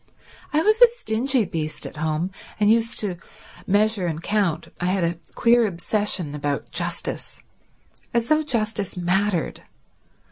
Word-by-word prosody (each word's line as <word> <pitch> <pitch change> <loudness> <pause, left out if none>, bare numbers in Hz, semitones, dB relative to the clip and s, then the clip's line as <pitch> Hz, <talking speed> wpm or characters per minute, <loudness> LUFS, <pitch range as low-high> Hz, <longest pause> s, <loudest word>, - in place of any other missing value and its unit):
I 310 +2 +2
was 435 +4 +3
a 485 - +11
stingy 265 - 0
beast 160 -3 -3
at - - -8
home, 160 +4 -1 0.3
and 210 0 +5
used 230 0 +3
to 195 -5 -2 0.5
measure 205 -1 +2
and 160 -2 -2
count. 200 -6 0
I 175 - -2
had 185 0 +1
a 170 0 -1 0.2
queer 235 -1 +4
obsession 185 -3 -1
about 145 -3 -3
justice. - - -3 0.7
As 235 -1 0
though 310 0 +3
justice 215 - -2
mattered. 180 0 0
205 Hz, 140 wpm, -23 LUFS, 170-230 Hz, 0.7 s, a